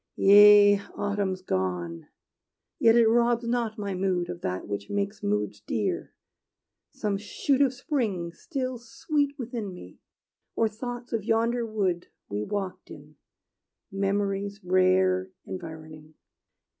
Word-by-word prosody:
Yea, 205 Hz, 0 st, +8 dB, 0.2 s
autumn's 200 Hz, -2 st, -2 dB
gone! 90 Hz, -, -3 dB, 0.7 s
Yet 225 Hz, 0 st, +5 dB
it 235 Hz, -1 st, +6 dB
robs 235 Hz, +1 st, +2 dB
not 235 Hz, -2 st, -1 dB
my 200 Hz, -2 st, -3 dB
mood 180 Hz, -2 st, -1 dB
Of 175 Hz, -1 st, -6 dB
that 90 Hz, 0 st, -3 dB
which 100 Hz, 0 st, -5 dB
makes 200 Hz, 0 st, -2 dB
moods 105 Hz, 0 st, -1 dB
dear, 105 Hz, -1 st, -2 dB, 0.8 s
some 205 Hz, -2 st, -2 dB
shoot 265 Hz, +6 st, 0 dB
of 275 Hz, -3 st, +4 dB
spring 235 Hz, -, -2 dB
Still 255 Hz, -, -4 dB
sweet 285 Hz, +4 st, -2 dB
within 235 Hz, -6 st, -5 dB
me; 90 Hz, -, -13 dB, 0.6 s
or 225 Hz, -, +2 dB
thoughts 240 Hz, +3 st, -7 dB
of 225 Hz, -3 st, -1 dB
yonder 230 Hz, +1 st, +1 dB
wood 190 Hz, -5 st, -1 dB, 0.2 s
We 100 Hz, +1 st, -2 dB
walked 185 Hz, -, -4 dB
in, 150 Hz, 0 st, -13 dB, 0.7 s
memory's 200 Hz, +1 st, -1 dB
rare 185 Hz, 0 st, +3 dB, 0.2 s
environing. 155 Hz, -3 st, -9 dB
200 Hz, 120 wpm, -27 LUFS, 175-230 Hz, 0.8 s, Yea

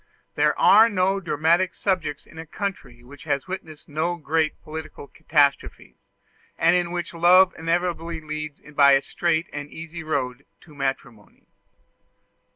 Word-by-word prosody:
There -, -, +1 dB
are 220 Hz, +3 st, +6 dB
no 195 Hz, -1 st, +1 dB
dramatic 170 Hz, +1 st, +1 dB
subjects 170 Hz, -7 st, -2 dB
in 160 Hz, -, -14 dB
a 160 Hz, -, -7 dB
country 165 Hz, -11 st, -6 dB
which 135 Hz, +2 st, -14 dB
has 140 Hz, +4 st, -2 dB
witnessed 160 Hz, -5 st, -8 dB
no 160 Hz, +4 st, -2 dB
great 160 Hz, -1 st, -1 dB
political 155 Hz, -1 st, -8 dB
catastrophes, 145 Hz, -2 st, 0 dB, 0.6 s
and 170 Hz, +2 st, +3 dB
in 175 Hz, -1 st, 0 dB
which 175 Hz, 0 st, -5 dB
love 180 Hz, +2 st, +5 dB
invariably 170 Hz, 0 st, -2 dB
leads 155 Hz, -1 st, -6 dB
by 140 Hz, -1 st, +6 dB
a 135 Hz, 0 st, +3 dB
straight 170 Hz, -1 st, -1 dB
and 145 Hz, 0 st, -6 dB
easy 165 Hz, +2 st, -8 dB
road 135 Hz, -4 st, -3 dB
to 155 Hz, -, -17 dB
matrimony. 135 Hz, -6 st, -6 dB
160 Hz, 140 wpm, -23 LUFS, 145-175 Hz, 0.6 s, are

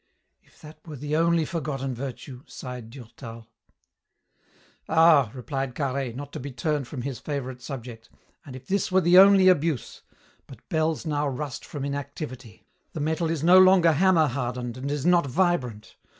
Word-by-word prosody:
"If -, -, -27 dB
that 155 Hz, +1 st, -13 dB
were 155 Hz, -, -7 dB
the 145 Hz, +2 st, -3 dB
only 165 Hz, 0 st, +2 dB
forgotten 135 Hz, -5 st, -4 dB
virtue!" 130 Hz, 0 st, -8 dB
sighed 125 Hz, -3 st, -8 dB
Durtal. 115 Hz, -2 st, -11 dB, 1.4 s
"Ah!" 160 Hz, -6 st, +5 dB
replied 135 Hz, 0 st, -4 dB
Carhaix, 135 Hz, -3 st, -3 dB
not 140 Hz, +2 st, -8 dB
to -, -, -5 dB
be 140 Hz, +2 st, -7 dB
turned 140 Hz, +2 st, -2 dB
from 125 Hz, -3 st, -6 dB
his 135 Hz, -4 st, -5 dB
favourite 130 Hz, -4 st, -5 dB
subject, 120 Hz, -4 st, -9 dB, 0.3 s
"and 130 Hz, -, -10 dB
if 130 Hz, 0 st, -11 dB
this 195 Hz, +2 st, -1 dB
were 190 Hz, +1 st, +4 dB
the 175 Hz, +1 st, +6 dB
only 195 Hz, -1 st, +7 dB
abuse! 155 Hz, -9 st, +1 dB, 0.5 s
But -, -, -15 dB
bells 160 Hz, +1 st, -1 dB
now 150 Hz, -1 st, -1 dB
rust 140 Hz, 0 st, -5 dB
from 140 Hz, -2 st, -6 dB
inactivity. 140 Hz, -, -7 dB, 0.3 s
The -, -, -5 dB
metal 160 Hz, +2 st, -1 dB
is 160 Hz, -3 st, -2 dB
no 180 Hz, +2 st, +7 dB
longer 185 Hz, -3 st, +6 dB
hammer 170 Hz, +1 st, +3 dB
hardened 125 Hz, -2 st, -4 dB
and 130 Hz, +2 st, -5 dB
is 145 Hz, 0 st, -3 dB
not 175 Hz, -4 st, +3 dB
vibrant. 130 Hz, -, -1 dB
140 Hz, 165 wpm, -25 LUFS, 125-160 Hz, 1.4 s, only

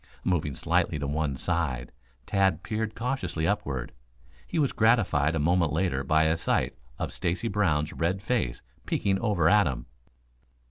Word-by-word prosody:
Moving 75 Hz, -6 st, 0 dB
slightly -, -, +1 dB
to 70 Hz, -, -3 dB
one 75 Hz, -1 st, -1 dB
side, 65 Hz, -8 st, -2 dB, 0.3 s
Tad 95 Hz, -4 st, +1 dB
peered 110 Hz, 0 st, -3 dB
cautiously 105 Hz, -10 st, -2 dB
upward. 70 Hz, -11 st, -2 dB, 0.6 s
He -, -, -3 dB
was 145 Hz, -4 st, +2 dB
gratified 100 Hz, -, +3 dB
a -, -, 0 dB
moment 85 Hz, +1 st, +2 dB
later 80 Hz, -5 st, 0 dB
by 80 Hz, +3 st, +3 dB
a 80 Hz, +1 st, +2 dB
sight -, -, 0 dB, 0.2 s
of -, -, -4 dB
Stacy 90 Hz, +7 st, -1 dB
Brown's 80 Hz, -8 st, +1 dB
red 90 Hz, +4 st, 0 dB
face 105 Hz, -, -1 dB, 0.2 s
peeking 95 Hz, -1 st, +1 dB
over 100 Hz, -8 st, +2 dB
at 105 Hz, -1 st, +5 dB
him. -, -, -4 dB
85 Hz, 150 wpm, -27 LUFS, 75-105 Hz, 0.6 s, at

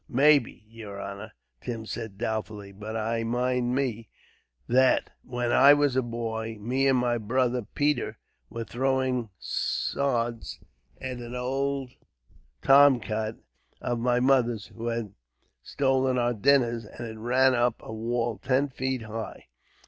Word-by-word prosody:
"Maybe, 140 Hz, -4 st, +3 dB
yer 110 Hz, -3 st, -9 dB
honor," 100 Hz, +2 st, -7 dB, 0.3 s
Tim 115 Hz, -2 st, -5 dB
said 110 Hz, -2 st, -6 dB
doubtfully; 110 Hz, -2 st, -4 dB
"but 105 Hz, +3 st, -6 dB
I 115 Hz, +1 st, -1 dB
mind 125 Hz, +1 st, 0 dB
me 120 Hz, -5 st, -2 dB, 0.6 s
that, 130 Hz, +2 st, +3 dB
when 120 Hz, -1 st, -2 dB
I 140 Hz, +3 st, +7 dB
was 145 Hz, -3 st, +2 dB
a 130 Hz, -, +3 dB
boy, 115 Hz, -2 st, -4 dB
me 130 Hz, +6 st, 0 dB
and 135 Hz, -1 st, +4 dB
my 120 Hz, -1 st, +1 dB
brother 125 Hz, +3 st, 0 dB
Peter 145 Hz, +1 st, 0 dB, 0.3 s
was 115 Hz, -1 st, -5 dB
throwing 130 Hz, -1 st, 0 dB
sods 120 Hz, -4 st, -2 dB, 0.4 s
at 130 Hz, -2 st, -5 dB
an 120 Hz, +1 st, -7 dB
old 135 Hz, +1 st, -2 dB, 0.7 s
tomcat 120 Hz, -6 st, +4 dB, 0.4 s
of 120 Hz, -1 st, -2 dB
my 120 Hz, +1 st, +2 dB
mother's, 125 Hz, -4 st, +2 dB
who 115 Hz, +1 st, -5 dB
had 115 Hz, -4 st, -3 dB, 0.5 s
stolen 130 Hz, -2 st, +1 dB
our 120 Hz, 0 st, +1 dB
dinners, 120 Hz, -1 st, +2 dB
and 120 Hz, +3 st, -8 dB
it 110 Hz, -1 st, -8 dB
ran 130 Hz, +3 st, +3 dB
up 120 Hz, -1 st, +2 dB
a -, -, -7 dB
wall 115 Hz, +1 st, -2 dB
ten 135 Hz, +2 st, +1 dB
feet 130 Hz, -2 st, -3 dB
high. 110 Hz, 0 st, -7 dB
120 Hz, 135 wpm, -27 LUFS, 115-130 Hz, 0.7 s, I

